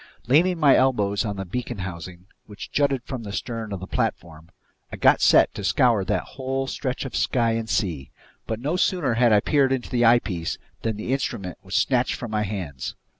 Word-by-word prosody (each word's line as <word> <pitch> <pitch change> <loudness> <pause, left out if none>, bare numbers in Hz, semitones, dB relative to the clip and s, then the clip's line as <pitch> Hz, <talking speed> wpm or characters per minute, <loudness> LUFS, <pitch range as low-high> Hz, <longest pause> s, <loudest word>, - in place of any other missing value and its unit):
Leaning 165 +7 +3
my 145 -4 +6
elbows 105 -6 +2
on 105 -3 -3
the 95 0 -5
beacon 120 +4 -4
housing, 90 -1 -7 0.2
which 105 -1 -9
jutted 140 -3 +1
from 130 -2 -6
the 105 -3 -7
stern 115 0 -4
of 100 - -4
the 95 - -7
platform, 80 -3 -3 0.4
I - - -5
got - - +4
set - - +5
to 100 - -6
scour 115 -1 +3
that - - 0
whole 135 0 -4
stretch 135 0 -3
of 135 - -6
sky 115 -3 +1
and 115 -1 -2
sea. 80 - -1 0.4
But 110 -1 -3
no 150 +8 -1
sooner 175 -9 +1
had 120 0 +3
I 105 -1 +5
peered 140 0 +2
into 130 -3 -2
the 120 -1 +2
eyepiece 110 -8 +2 0.2
than 110 -2 -2
the 115 +4 -2
instrument 95 -9 -3
was 95 0 -6
snatched 125 +2 +2
from 120 -3 -7
my 105 -1 0
hands. 90 -10 -5
115 Hz, 200 wpm, -24 LUFS, 95-130 Hz, 0.4 s, my